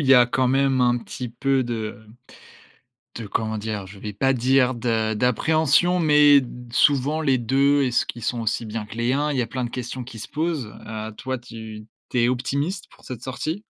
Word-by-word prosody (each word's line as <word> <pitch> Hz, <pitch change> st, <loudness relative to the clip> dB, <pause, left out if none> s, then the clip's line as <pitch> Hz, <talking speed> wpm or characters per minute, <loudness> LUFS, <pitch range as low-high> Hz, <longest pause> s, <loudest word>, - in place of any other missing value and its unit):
il 145 Hz, -, -1 dB
y 135 Hz, -, +7 dB
a 125 Hz, -1 st, +7 dB
quand 125 Hz, +1 st, +1 dB
même 135 Hz, 0 st, +2 dB
un 120 Hz, -1 st, +3 dB
petit 125 Hz, +1 st, -7 dB
peu 135 Hz, +2 st, 0 dB
de 110 Hz, -3 st, -4 dB, 1.2 s
de 115 Hz, -3 st, -6 dB
comment 110 Hz, +2 st, -2 dB
dire? 105 Hz, -2 st, -4 dB
Je 95 Hz, +1 st, -12 dB
vais 105 Hz, 0 st, -6 dB
pas 135 Hz, +6 st, +2 dB
dire 130 Hz, +1 st, +3 dB
de 115 Hz, -2 st, 0 dB
d'appréhension 155 Hz, +9 st, +2 dB
mais 150 Hz, -3 st, +6 dB, 0.3 s
souvent 145 Hz, +4 st, +2 dB
les 135 Hz, -4 st, +2 dB
2, 140 Hz, +4 st, +2 dB
est-ce 125 Hz, -2 st, +1 dB
qu'ils 120 Hz, -, -7 dB
sont 120 Hz, +1 st, -1 dB
aussi 110 Hz, +1 st, -1 dB
bien 110 Hz, 0 st, -5 dB
que 105 Hz, -, -11 dB
les 120 Hz, +2 st, 0 dB
1? 150 Hz, +2 st, 0 dB
Il 135 Hz, -, -2 dB
y -, -, +2 dB
a 115 Hz, -, -2 dB
plein 125 Hz, +2 st, -3 dB
de -, -, -5 dB
questions 125 Hz, +1 st, -5 dB
qui 120 Hz, -1 st, -11 dB
se -, -, -7 dB
posent. 155 Hz, -7 st, -2 dB
Heu, 110 Hz, 0 st, -5 dB
toi 130 Hz, 0 st, -3 dB
tu 110 Hz, -3 st, -10 dB, 0.2 s
tu 125 Hz, -, 0 dB
es 120 Hz, -, +3 dB
optimiste 140 Hz, +9 st, -2 dB
pour -, -, -21 dB
cette 125 Hz, -3 st, -8 dB
sortie? 155 Hz, +9 st, -4 dB
125 Hz, 210 wpm, -23 LUFS, 115-140 Hz, 1.2 s, y